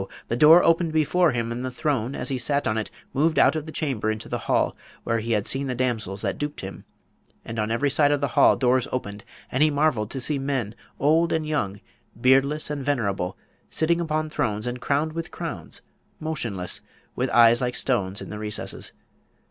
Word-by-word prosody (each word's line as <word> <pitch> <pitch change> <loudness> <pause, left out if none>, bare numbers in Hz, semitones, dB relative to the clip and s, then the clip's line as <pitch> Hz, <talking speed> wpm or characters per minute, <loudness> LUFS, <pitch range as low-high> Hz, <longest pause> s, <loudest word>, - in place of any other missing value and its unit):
the - - 0
door 155 +7 +7
opened 165 0 +3
before 155 +3 +3
him, 115 -2 -2
and 120 +2 -4
the 130 - -2
throne 130 -2 -1
as - - -3
he 130 -2 -1
sat 140 +3 +1
on 110 - +1
it 110 -1 -2 0.2
moved 155 +4 +2
out 135 +4 +5
of 155 0 -4
the - - -6
chamber 130 -10 -1
into 110 0 -3
the - - -3
hall - - +2 0.3
where 115 0 0
he 115 +1 -1
had 105 -2 +1
seen 135 +1 -1
the 125 - -2
damsels 110 -6 -2
that - - -2
duped 150 0 -4
him, 95 0 -8 0.6
and 115 0 -5
on 105 0 0
every 115 +5 +1
side 145 0 +4
of 145 - +2
the 140 -1 -1
hall - - +5
doors 125 -1 +2
opened; 100 -5 -4 0.3
and 130 - 0
he 155 - +6
marvelled 140 -8 +1
to 135 - -2
see 140 +2 +1
men, 135 -6 -2 0.3
old 160 +4 +3
and 160 -1 0
young, 105 -10 -2 0.4
beardless 135 +5 +3
and 145 -2 -3
venerable, 100 -9 -1 0.3
sitting 170 +2 +2
upon 155 -1 -1
thrones 115 -8 -2
and 125 0 -4
crowned 150 +3 0
with 165 0 -4
crowns, - - -6 0.4
motionless, 115 - -2 0.3
with - - -1
eyes 120 0 +6
like 125 -1 -1
stones 100 -6 0
in - - -9
the 105 - -6
recesses. 105 -1 -4
130 Hz, 205 wpm, -24 LUFS, 115-150 Hz, 0.6 s, door